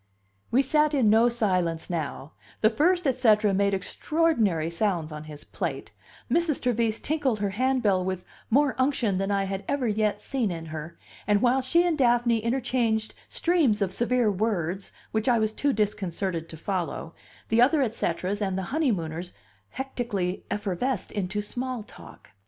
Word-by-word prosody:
We 265 +4 +3
sat 300 +2 +2
in 235 -7 +4
no 225 +2 +5
silence 185 -8 0
now; 155 -3 -4 0.3
the 220 - +5
first 350 +8 +2
et 260 -2 +1
cetera 210 -4 +4
made 200 0 +2
extraordinary 205 - 0
sounds 170 -4 -1
on 150 0 -7
his 150 -1 -10
plate, - - -4 0.4
Mrs. 335 -4 +1
Trevise 230 -3 0
tinkled 285 -6 0
her 200 -1 -1
handbell 225 -4 +1
with 185 -1 -3 0.2
more 280 +3 +3
unction 245 -8 +1
than 195 +1 -1
I 200 -1 +1
had 195 0 -4
ever 280 -3 0
yet 210 -1 +1
seen 245 -1 -1
in 165 -2 -5
her; 160 +1 -7 0.3
and 205 -1 +4
while 255 +3 +3
she 335 +7 +3
and 330 -4 0
Daphne 240 -2 +3
interchanged 230 -2 0 0.2
streams 320 -12 +2
of 195 -3 0
severe 240 0 +2
words 190 -3 -2 0.2
which 220 +3 0
I 240 - +4
was 220 -1 0
too 285 +5 +1
disconcerted 195 -6 -2
to 160 - -9
follow, 170 -2 -3 0.4
the 225 +2 +4
other 285 +3 +4
et 225 -4 -1
ceteras 185 +1 -2
and 190 -2 -1
the 190 - -2
honeymooners 180 - -1 0.4
hectically 235 -9 -3
effervesced 205 +3 -2
into 205 +1 -2
small 250 +1 -4
talk. - - -15
215 Hz, 165 wpm, -26 LUFS, 190-255 Hz, 0.4 s, no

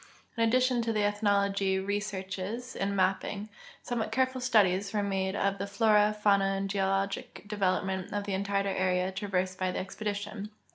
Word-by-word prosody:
In 230 - -2
addition 250 +2 +3
to 230 0 -1
the 215 -1 +1
ethnologic 200 -2 +1
researches 200 +3 -3
and 200 0 -1
ma])ping, 195 +2 0 0.3
somewhat 225 -3 -2
careful 260 +1 +1
studies 200 -5 +3
were 205 - +2
made 190 -1 -1
of 200 -1 0
the 200 - -2
flora, 210 +1 +4
fauna, 200 -2 +3
and 195 0 -2
geologic 195 0 -1
development 190 -2 -1
of 205 0 -2
the 200 -1 -3
entire 200 +1 0
area 185 -1 +1
trav 195 +2 -5
ersed 185 0 0
by 185 0 +1
the - - -4
expedition. 205 +1 -4
200 Hz, 160 wpm, -30 LUFS, 190-210 Hz, 0.3 s, flora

